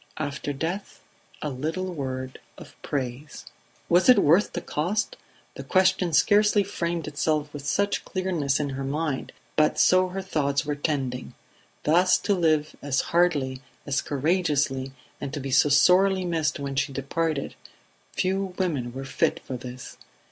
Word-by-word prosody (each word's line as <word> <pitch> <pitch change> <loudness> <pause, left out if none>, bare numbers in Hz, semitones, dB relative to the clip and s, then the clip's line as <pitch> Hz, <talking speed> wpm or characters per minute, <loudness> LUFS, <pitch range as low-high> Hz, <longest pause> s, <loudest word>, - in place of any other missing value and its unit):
After 145 -1 -3
death, 165 +8 -4 0.4
a 150 - -2
little 160 +8 -3
word 130 -3 -5 0.2
of - - -13
praise. 135 +1 -5 0.4
Was 175 +7 +4
it 250 - +9
worth 170 +8 +4
the 175 - -2
cost? 200 - -1 0.4
The - - -8
question 185 -2 +2
scarcely 205 +4 +4
framed 170 -4 -3
itself 150 0 -1
with 145 -1 -7
such 200 +4 0
clearness 170 -8 -1
in 145 -2 -2
her 135 +1 -4
mind, 145 0 -2 0.2
but 155 0 +3
so 185 0 +5
her 190 +1 -5
thoughts 140 -6 0
were 150 - -1
tending. 135 -4 -3 0.5
Thus 180 +4 +4
to 205 - 0
live, 155 -4 +1
as 140 -1 0
hardly, 145 -7 +2 0.2
as 140 -2 0
courageously, 145 -3 0 0.3
and 135 - -4
to - - -3
be 135 0 -5
so 140 +3 +4
sorely 185 +5 +4
missed 160 -4 0
when 140 -1 -4
she 140 +1 0
departed, 140 +2 -2 0.6
few 190 0 -1
women 145 -11 -1
were 135 +1 -6
fit - - 0
for 130 - -5
this. 125 0 -9
150 Hz, 150 wpm, -25 LUFS, 140-180 Hz, 0.6 s, it